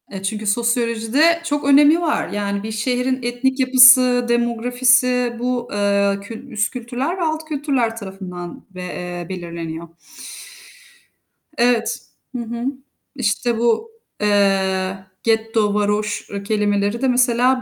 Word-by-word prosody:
E, 195 -1 -8
çünkü 215 +2 -3
sosyolojide 235 +8 +1
çok 290 -3 -2
önemi 295 +4 +5
var. 320 -3 0
Yani 200 -1 -3
bir 220 - -5
şehrin 250 +4 -1
etnik 250 +3 -1
yapısı, 255 -1 +6
demografisi 245 +1 +2
bu, 245 0 -2
eee, 200 -1 +1
kül 225 +6 -10
üst 205 -3 -1
kültürler 250 +7 -3
ve - - -5
alt 315 -1 -2
kültürler 275 -7 -1
tarafından 185 -4 -8
ve, 185 - -7
eee, 180 -1 -6
belirleniyor. 170 -2 -6 1.7
Evet. 240 -1 +1 0.4
Hı 245 - -2
hı. 235 +1 -5 0.5
İşte 235 -1 -1
bu, 235 - 0 0.3
eee, 195 -2 +1 0.3
getto, 220 -2 +1
varoş 210 0 -1
ı 200 0 -6
kelimeleri 205 +1 0
de 265 - +2
mesela 250 0 +2
235 Hz, 125 wpm, -20 LUFS, 205-250 Hz, 1.7 s, yapısı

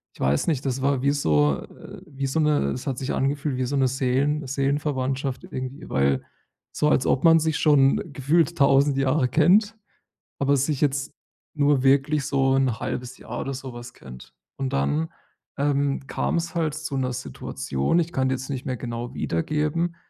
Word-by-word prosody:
ich - - -19
weiß 70 +2 +1
nicht, 145 -5 0
das 130 0 -1
war 140 -2 +1
wie 140 - +2
so 75 - +2
äh, - - -12
wie 140 -2 -4
so 135 +4 -1
'ne 150 - +2
das 125 - -7
hat 130 - -2
sich 135 - -3
angefühlt 140 0 -1
wie 130 - 0
so 140 - -2
'ne 135 -1 +3
Seelen 135 +3 0
Seelenverwandtschaft 135 -1 -1
irgendwie 130 +2 -7
weil 70 0 +1 0.5
so, 150 - +1
als 130 - +2
ob 130 - +1
man 165 0 +7
sich 160 -1 0
schon 145 +4 +3
gefühlt 165 +5 +1
1.000 140 0 +4
Jahre 135 0 +2
kennt, 195 - +3 0.6
aber 140 0 +3
sich 140 +1 0
jetzt 140 -1 0 0.4
nur 145 -3 +2
wirklich 140 +2 +3
so 135 -2 +2
1/2 125 0 -2
Jahr - - -6
oder 135 - -4
so 130 -1 -7
was 120 +1 -9
kennt. 65 0 -13 0.2
Und 135 -1 -3
dann, 70 +4 0 0.5
ähm, 140 -1 0
kam's 170 +1 -2
halt 160 -3 0
zu 150 -2 -5
'ner 130 -1 -1
Situation 70 - -2
ich 170 0 -1
kann 130 0 +1
die - - +1
jetzt 130 +1 -7
nicht 130 -3 -4
mehr 130 -1 -2
genau 120 +1 -5
wiedergeben, 155 - -1
135 Hz, 180 wpm, -24 LUFS, 130-150 Hz, 0.6 s, man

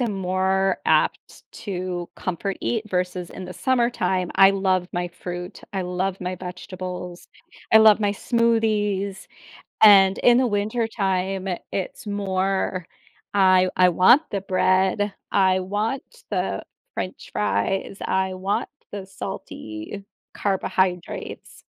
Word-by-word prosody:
am 235 -4 0
more 190 0 0
apt - - +1 0.2
to 180 -3 -4
comfort 190 +2 -3
eat 220 -2 -2
versus 180 -1 -2
in 185 - -8
the 180 - -7
summertime; 235 -7 0
I 195 0 +8
love 190 -2 0
my 175 0 -2
fruit, 180 +2 -7
I 190 - -1
love 185 +1 -2
my 180 0 -3
vegetables, 180 0 -7 0.5
I 220 - +9
love 220 -1 +7
my 205 -1 +1
smoothies. 210 -4 0 0.6
And, 195 -2 +7
in 245 0 +5
the 260 - +3
wintertime, 200 -3 -1 0.2
it's 195 +2 -4
more; 190 -3 -1 0.5
I 185 -2 +5
I 180 0 +6
want 185 - +6
the 200 -2 -2
bread, 190 +2 +2 0.2
I 190 -1 +3
want 210 +8 -2 0.3
the - - -1 0.3
french 185 - -5
fries, 105 - -1
I 190 0 0
want 190 +2 -2 0.2
the 200 -2 -6
salty 110 - -7 0.3
carbohydrates. 185 -2 -2
190 Hz, 120 wpm, -23 LUFS, 185-205 Hz, 0.6 s, I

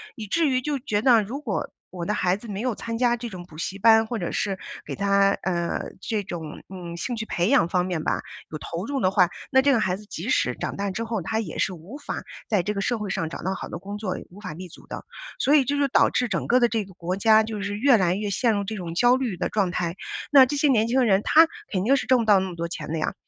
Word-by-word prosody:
以 220 - -6
至 320 +10 +1
于 255 -1 +2
就 285 +1 -2
觉 215 -5 -1
得 240 -4 +6
如 235 +8 -5
果 300 - -3 0.2
我 175 -2 -5
的 210 - 0
孩 185 -3 +1
子 215 +3 -10
没 200 0 -4
有 245 -1 -1
参 230 +2 -4
加 240 0 +3
这 235 0 -6
种 180 -3 -9
补 155 -3 -14
习 190 +4 -4
班， 225 +1 +6
或 225 0 -4
者 175 - -2
是 195 -3 -1 0.3
给 - - -5
他， 200 0 +3
呃， 170 -2 -1 0.2
这 215 -3 -2
种， 165 -4 -7
嗯， 175 -3 -8
兴 240 +7 -3
趣 220 - -4
培 175 -4 0
养 225 -9 +4
方 180 0 +1
面 175 -4 -2
吧 - - 0 0.3
有 155 - -5
投 170 +5 -5
入 280 +2 -2
的 185 -6 +2
话， 180 -3 +4 0.2
那 265 -1 +5
这 280 +1 +3
个 240 - +3
孩 185 -3 +1
子 210 - -12
即 195 -1 -7
使 125 - +1
长 - - -4
大 200 0 -2
之 225 +5 -3
后， 225 -3 -2
他 220 +6 -2
也 200 -8 -5
是 - - +1
无 180 - -9
法 - - -5 0.3
在 205 -4 +3
这 210 +2 -1
个 200 - -2
社 240 +2 0
会 210 -2 -4
上 160 -3 -2
找 - - -7
到 190 - -1
好 - - -7
的 - - -6
工 200 +2 -6
作， 195 -4 -3
无 195 +4 -14
法 185 -6 -6
立 180 +3 -8
足 - - -16
的。 - - -7 0.3
所 285 - +4
以 290 - +6
这 285 +3 -1
就 280 - +3
导 - - +4
致 250 - 0
整 190 -6 -2
个 250 +2 +4
的 240 - +4
这 225 -2 -1
个 190 -1 -14
国 180 +1 -3
家 220 +2 +5
就 215 -2 -5
是 200 0 -3
越 255 +2 +5
来 180 -4 +2
越 205 0 -2
陷 230 +4 +2
入 200 -1 -1
这 220 - -4
种 175 -4 -5
焦 245 +7 +4
虑 240 -9 -2
的 - - -1
状 200 -4 0
态， 175 0 -2 0.4
那 270 -2 +9
这 290 +3 -3
些 295 - +3
年 230 -4 +3
轻 255 +1 +3
人， 195 -3 +3
他 325 +1 +6 0.2
肯 185 -1 -1
定 270 +4 +5
是 - - -1
挣 255 -1 +5
不 230 - 0
到 205 -3 +5
那 190 - -3
么 175 - -8
多 170 - -2
钱 155 -3 -7
的 165 - -2
呀， - - -1
205 Hz, 310 characters per minute, -24 LUFS, 185-240 Hz, 0.4 s, 那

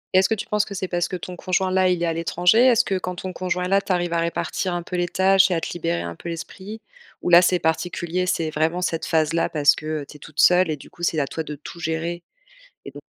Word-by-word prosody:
Et - - +8
est-ce 190 - +2
que 220 - +2
tu - - -6
penses 210 -1 +1
que 200 - -8
c'est 185 0 -3
parce 175 -1 -1
que - - -5
ton 180 0 -7
conjoint-là, 185 0 +1
il 180 -1 0
est - - +2
à 165 - 0
l'étranger? 175 +5 +2
Est-ce 250 -1 +4
que, 190 -1 -1
quand 180 0 -5
ton 185 +1 -6
conjoint 180 0 -2
est - - -2
là, 195 +1 +3
tu 195 - -5
arrives 175 -1 0
à 170 - +1
répartir 170 +2 -2
un 175 - -3
peu 180 - -6
les 175 0 0
tâches 190 +2 +4
et 180 - +1
à 165 - -1
te - - -4
libérer 85 - -2
un 85 0 -6
peu 170 - -8
l'esprit? 190 +6 -8 0.4
Ou - - 0
là, 175 0 +9
c'est 180 0 +3
particulier. 175 +2 -1
C'est 165 -3 0
vraiment 160 +3 0
cette 165 -2 -2
phase-là 160 +1 +1
parce 145 -2 +4
que 155 -1 -4
tu 150 - -12
es - - -25
toute 150 +1 -11
seule 180 -1 +5
et 155 - -2
du - - -15
coup, - - -16
c'est 170 -2 0
à 140 - +1
toi 160 - -5
de 150 -1 -7
tout 155 +4 -11
gérer 165 +1 -3 0.6
et - - -8
donc? - - -12
175 Hz, 285 wpm, -22 LUFS, 160-185 Hz, 0.6 s, là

